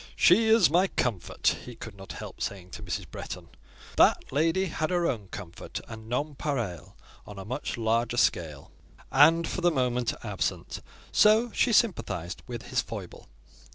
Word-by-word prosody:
"She 220 +6 +5
is 220 -4 +6
my 180 +4 +4
comfort!" 115 - 0
he 125 - -9
could 110 -2 -9
not 95 0 -9
help - - -9
saying 95 -2 -4
to - - -8
Mrs. 90 -4 -4
Bretton. - - -7 0.5
That - - +4
lady 165 +6 +2
had 155 -3 -2
her 175 -1 +1
own 110 - -2
"comfort" 90 -3 -7
and 110 -1 -10
nonpareil 135 - -3 0.3
on 105 - -9
a 95 - -7
much 130 +5 -4
larger 115 +1 0
scale, 75 -10 0 0.4
and, 160 +4 +5
for 185 - -3
the 175 - +4
moment, 125 -5 0
absent; 105 -4 -3 0.3
so 220 +3 +5
she 240 - +2
sympathised 165 - +1
with 120 -2 -7
his - - +1
foible. - - -9
125 Hz, 155 wpm, -28 LUFS, 105-170 Hz, 0.5 s, is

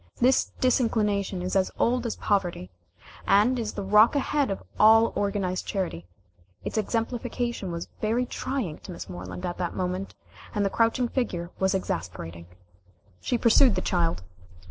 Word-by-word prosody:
This 255 +2 +3
disinclination 210 -7 +1
is 185 +1 -2
as 190 -1 +3
old 245 0 +1
as 225 - -3
poverty, 175 - -1 0.6
and 230 +6 +4
is 220 -2 -3
the 200 - -4
rock 210 +6 +5
ahead 285 0 +1
of 195 - -4 0.2
all 225 +1 +6
organized 200 -3 -1
charity. 175 - -3 0.6
Its - - -4
exemplification 230 -1 -2
was 170 0 -5
very 230 +3 +1
trying 245 - -3
to - - -10
Miss 170 - -7
Moreland 90 0 -7
at 175 - -4
that 175 - -2
moment, 185 +1 -3 0.4
and 205 -1 +1
the 195 - 0
crouching 230 +2 +2
figure 180 -9 -2
was 190 0 +2
exasperating. 85 - -4 0.7
She 245 - 0
pursued 235 +1 +5
the - - 0
child. 165 - 0
200 Hz, 150 wpm, -26 LUFS, 180-235 Hz, 0.7 s, all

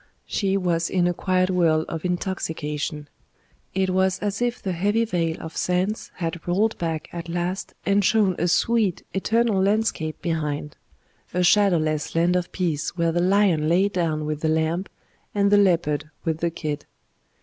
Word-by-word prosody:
She 195 -1 0
was 170 -3 0
in 180 -2 +2
a 175 - +1
quiet 185 +1 +1
whirl 165 -3 +2
of 165 -1 -5
intoxication; 160 -5 -3 0.7
it 190 -1 +1
was 190 0 +2
as 205 +2 -3
if 245 0 0
the 190 - -3
heavy 205 +6 +1
veil 165 -6 -1
of 160 - -8
sense 185 +4 -1
had 170 -1 -3
rolled 205 +5 +2
back 165 -2 -2
at 170 0 -6
last 175 +3 -3
and 200 +1 +3
shown 200 -2 +3
a 175 - +1
sweet, 205 +1 +2
eternal 220 +1 +1
landscape 195 -6 0
behind 150 -3 -3 0.6
a 180 - +2
shadowless 170 -7 +2
land 170 +2 +3
of 180 -1 -1
peace 170 -2 -2
where 170 -1 +2
the 175 +1 +1
lion 180 -5 +3
lay 190 +4 +3
down 165 -5 -1
with 150 0 -3
the 160 - +1
lamb, 160 +4 0 0.5
and 200 0 +3
the 205 - +6
leopard 165 -6 +2 0.2
with 160 -1 -1
the 170 - +1
kid. 150 -3 -5
175 Hz, 165 wpm, -24 LUFS, 160-195 Hz, 0.7 s, the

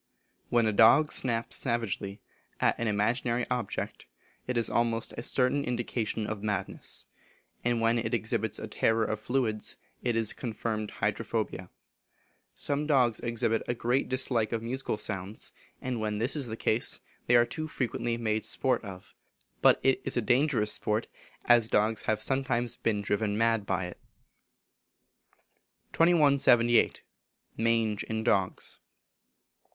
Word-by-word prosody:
When 120 -1 +3
a 110 - +1
dog 130 +9 +6
snaps 115 -2 0
savagely 115 -5 -2 0.4
at - - +3
an 115 - -1
imaginary 115 +3 0
object, 125 -5 -3 0.4
it 125 -1 -1
is 115 - +2
almost 115 -1 0
a - - -5
certain 130 +3 +1
indication 120 -3 -2
of 105 -1 -4
madness; 105 -2 -3 0.6
and 120 -1 +1
when 115 +1 +3
it 115 -1 -2
exhibits 110 -2 0
a - - -5
terror 115 0 +1
of 110 0 -2
fluids, 110 -2 -1 0.2
it 120 -2 0
is 115 -2 +1
confirmed 110 -2 -3
hydrophobia. - - -2 0.9
Some 145 +1 -1
dogs 125 -6 +3
exhibit 115 -1 0
a 120 - -1
great 120 +3 0
dislike 130 -4 0
of 115 -1 -2
musical 125 -1 -2
sounds, 100 -1 -3 0.3
and 125 -2 -2
when 105 -1 -2
this 120 +8 +1
is 140 -4 -1
the 110 0 -5
case 110 +1 +1 0.3
they 120 - +5
are 120 0 +6
too 155 +5 -4
frequently 120 -4 -2
made 110 -2 -1
sport 130 -3 0
of. 95 -3 -10 0.5
But - - +6
it 135 -1 +3
is - - -1
a - - +3
dangerous 120 -2 +2
sport, 105 +2 0 0.4
as 120 -2 +5
dogs 105 +1 +2
have 110 0 +1
sometimes 125 -3 0
been 110 -5 -1
driven 105 +1 0
mad 115 -2 +1
by 95 -1 0
it. 90 - -9 1.9
2178. 140 -8 +4 0.5
Mange 115 -2 +1
in 110 0 -3
Dogs. 95 -5 0
115 Hz, 140 wpm, -29 LUFS, 110-125 Hz, 1.9 s, dog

